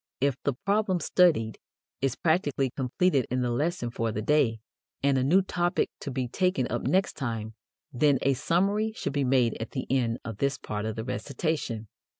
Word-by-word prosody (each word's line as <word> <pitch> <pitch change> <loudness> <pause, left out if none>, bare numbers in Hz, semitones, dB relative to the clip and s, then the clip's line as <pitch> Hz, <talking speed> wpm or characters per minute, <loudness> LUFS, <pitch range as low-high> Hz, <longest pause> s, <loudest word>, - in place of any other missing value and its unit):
If 140 -1 +2
the 140 - +1
problem 200 -2 +2
studied 150 -10 +3 0.4
is 135 -2 +1
practically 145 -6 +1
completed 135 +2 +1
in 125 +1 0
the 120 -1 0
lesson 145 -1 -1
for 115 -1 -1
the 105 0 -3
day, 125 -5 +2 0.4
and 140 -1 +3
a 130 - +2
new 180 +8 +4
topic 175 -1 0
to 145 - -5
be 130 -1 -2
taken 185 +8 +1
up - - -1
next 190 +2 +1
time, 115 -5 -4 0.4
then 140 +2 +4
a 140 - +3
summary 195 - +1
should - - -3
be 140 -1 +1
made 125 -4 +2
at 115 - -6
the 130 - -3
end 120 -3 +1
of 115 -3 -5
this 140 +4 0
part 105 0 -4
of 110 -1 -3
the 110 - -4
recitation. 130 -3 -3
135 Hz, 185 wpm, -28 LUFS, 120-170 Hz, 0.4 s, new